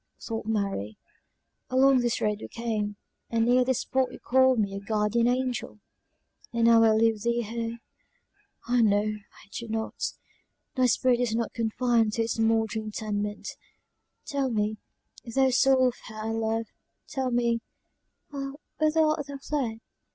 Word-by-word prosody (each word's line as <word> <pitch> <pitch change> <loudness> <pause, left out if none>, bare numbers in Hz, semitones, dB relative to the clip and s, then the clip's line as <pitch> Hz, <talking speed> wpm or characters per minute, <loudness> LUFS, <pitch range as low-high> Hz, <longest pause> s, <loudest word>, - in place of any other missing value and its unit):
thought 225 -2 -5
Mary, 195 - -2 0.7
"along 265 +1 +5
this 240 -1 0
road 210 -1 0
we - - -6
came, 215 -3 -3 0.3
and 225 -1 +1
near 250 +1 +4
this 255 -1 0
spot 260 -1 0
you - - -9
called 260 0 +4
me 205 -3 +1
your 195 - -4
guardian 210 +3 +1
angel 250 -4 -1 0.7
and 235 -1 0
now 230 -1 +7
I 225 - +6
leave 220 -1 +2
thee 235 +1 0
here! 230 +1 -4 0.9
ah! 245 0 +3
no, 205 -2 +4
I 210 -1 -7
do 235 - -6
not 220 0 -3 0.6
thy 255 -1 +3
spirit 245 0 +3
is 240 -3 0
not 230 -1 -2
confined 230 -1 +1
to 230 - +1
its 225 0 -3
mouldering 225 -1 +1
tenement! 210 -1 -3 0.8
Tell 275 -2 -1
me, 215 -1 -1 0.5
thou 260 +2 +2
soul 260 0 +4
of 245 - -9
her 220 - -10
I 215 +1 -3
love, 225 0 -1 0.4
tell 265 -1 -2
me, 235 -1 +1 0.7
ah! 275 -1 -4 0.3
whither 310 +1 +3
art 305 -2 +1
thou 280 -1 -6
fled?" 265 -6 -3
230 Hz, 155 wpm, -27 LUFS, 220-255 Hz, 0.9 s, now